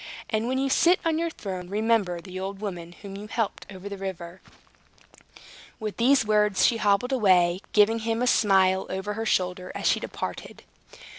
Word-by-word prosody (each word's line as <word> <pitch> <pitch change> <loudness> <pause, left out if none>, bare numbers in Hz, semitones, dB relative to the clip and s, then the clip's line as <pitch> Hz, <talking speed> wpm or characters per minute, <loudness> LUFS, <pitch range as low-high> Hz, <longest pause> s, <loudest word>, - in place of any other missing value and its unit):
And 220 +1 0
when 260 +1 0
you 270 +1 +1
sit 345 +6 +4
on 325 -1 +1
your 335 0 0
throne 185 - -7
remember 210 -4 +1
the 185 +1 -8
old 195 +1 -5
woman 175 -5 -6
whom 195 -1 -8
you 205 +2 -8
helped 225 -1 -3
over 190 0 -9
the 200 -1 -7
river." 185 -2 -7 1.4
With 215 -2 -5
these 255 +1 +4
words, 210 -2 +3
she 235 - +3
hobbled 210 +4 +1
away, 185 -7 +3
giving 215 +2 +4
him 225 +1 -1
a - - +2
smile 190 -5 +3
over 190 +2 -3
her 225 +1 -4
shoulder 180 -1 -1
as - - -5
she - - +3
departed. - - -6
205 Hz, 175 wpm, -26 LUFS, 185-225 Hz, 1.4 s, sit